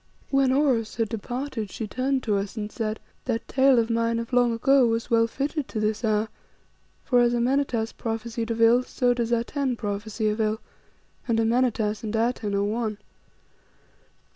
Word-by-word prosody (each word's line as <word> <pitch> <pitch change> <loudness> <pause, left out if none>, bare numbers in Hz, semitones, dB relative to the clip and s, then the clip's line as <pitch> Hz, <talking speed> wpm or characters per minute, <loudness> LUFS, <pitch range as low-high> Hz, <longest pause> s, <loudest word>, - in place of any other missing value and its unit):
When 270 -1 +3
Oros 260 -6 +1
had 225 -2 -1
departed 240 0 -4
she 220 - -5
turned 255 +4 -1
to 210 -3 +1
us 200 +1 -3
and 210 0 -4
said 215 -1 -3 0.3
"That 235 -2 -2
tale 270 -1 +4
of 230 0 +2
mine 230 0 +1
of 230 +2 -5
long 245 -1 +4
ago 255 +2 +4
was 230 +1 -2
well 230 0 +4
fitted 280 +4 -3
to 220 - -4
this 215 +2 -1
hour, 215 -1 +1 0.8
for 250 -2 +3
as 240 0 +3
Amenartas 240 -2 0
prophesied 225 0 -4
of 230 0 -2
ill, 235 +2 +6
so 250 -1 +1
does 235 -1 -2
Atene 250 +3 0
prophesy 215 0 -3
of 210 +1 -1
ill, 215 0 0 0.7
and 230 -2 +2
Amenartas 225 -2 +1
and 220 0 -3
Atene 225 -2 0
are 200 - +1
one. 215 0 -2
230 Hz, 170 wpm, -25 LUFS, 220-250 Hz, 0.8 s, ill